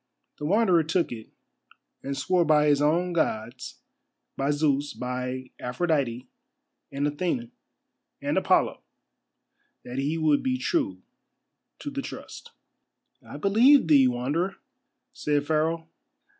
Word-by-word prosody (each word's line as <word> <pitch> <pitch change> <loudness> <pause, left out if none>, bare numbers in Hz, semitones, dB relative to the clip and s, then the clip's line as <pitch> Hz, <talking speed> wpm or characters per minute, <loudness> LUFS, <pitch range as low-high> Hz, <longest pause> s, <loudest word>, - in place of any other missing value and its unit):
The 150 - -4
Wanderer 185 -1 +4
took 165 +3 0
it, 110 -2 -8 0.7
and 140 0 -4
swore 180 +5 +2
by 150 -2 +4
his 145 -1 +3
own 170 +4 +2
Gods, 120 -6 -2 0.5
by 135 +1 -1
Zeus, 145 -1 +1
by 125 +1 -4
Aphrodite, 130 -3 -1 0.6
and 140 +1 -1
Athene, 145 -6 -2 0.7
and - - -2
Apollo, - - +2 1.0
that 125 +2 -5
he 145 +4 -1
would 155 -3 +2
be 255 -1 0
true 290 0 -1 0.7
to 290 - -6
the 280 0 -3
trust. - - -9 0.7
"I - - -10
believe 235 - +5
thee, 140 -4 +6
Wanderer," 140 +10 -1 0.6
said 145 -1 0
Pharaoh. 160 +1 0
150 Hz, 115 wpm, -26 LUFS, 135-175 Hz, 1.0 s, thee